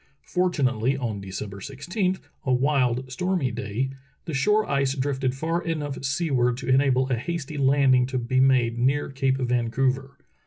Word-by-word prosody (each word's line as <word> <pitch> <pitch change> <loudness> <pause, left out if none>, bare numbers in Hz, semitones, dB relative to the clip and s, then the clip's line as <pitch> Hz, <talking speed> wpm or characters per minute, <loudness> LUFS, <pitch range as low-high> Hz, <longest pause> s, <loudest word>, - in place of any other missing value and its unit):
Fortu 180 -4 0
nately, 125 +2 +1
on 115 -6 -3
December 100 +1 -6
i6, 175 - -2 0.2
a 130 - 0
wild, 130 -1 +1
stormy 175 -2 0
day, 115 +4 -3 0.3
the 160 - -5
shore 210 +10 +2
ice 140 -1 +1
drifted 130 -1 -1
far 165 +5 -1
enough 150 -5 -3
seaward 135 -4 +1
to 135 - -7
enable 130 0 +3
a - - +3
hasty 155 +3 -4
landing 135 -2 +4
to 130 0 -2
be 125 +1 0
made 125 -3 +3
near 135 +4 +1
Cape 135 -1 +1
Vancouver. 130 +2 0
135 Hz, 155 wpm, -25 LUFS, 125-145 Hz, 0.3 s, landing